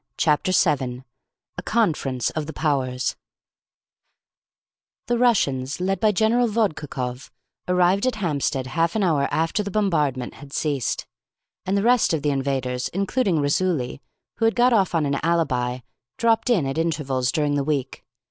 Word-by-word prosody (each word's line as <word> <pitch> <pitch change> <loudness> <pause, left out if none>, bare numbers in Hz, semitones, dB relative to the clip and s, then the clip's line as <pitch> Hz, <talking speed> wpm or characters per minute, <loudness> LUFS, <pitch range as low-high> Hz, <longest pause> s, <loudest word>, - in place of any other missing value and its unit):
Chapter 160 +4 +2
7 130 -8 +1 0.5
A - - -4
CONFERENCE 150 - 0
OF 155 -1 -4
THE 160 - -6
POWERS 135 -4 -1 1.9
The 240 0 0
Russians, 140 - +1
led 190 +2 0
by 215 -1 +3
General 225 +4 +2
Vodkakoff, 150 - -2 0.4
arrived 180 +5 +3
at 255 - 0
Hampstead 145 -8 -1
half 165 +7 0
an 215 - +1
hour 150 -6 +2
after 165 +6 0
the 200 - -4
bombardment 150 -11 0
had 140 -1 -13
ceased, 145 -5 -1 0.6
and 195 +1 +1
the 200 - 0
rest 240 -7 +3
of 150 - -4
the 145 - +2
invaders, 130 -2 -1
including 195 0 0
Raisuli, 145 -3 0 0.4
who 225 - +1
had 225 - +2
got 245 +1 +4
off 195 -5 +2
on 160 -2 +2
an 140 0 0
alibi, 130 -7 0 0.4
dropped 230 +1 +2
in 195 - +3
at 135 +4 -2
intervals 140 -6 0
during 150 -3 0
the 145 -1 +1
week. 140 -3 -2
160 Hz, 150 wpm, -23 LUFS, 135-200 Hz, 1.9 s, got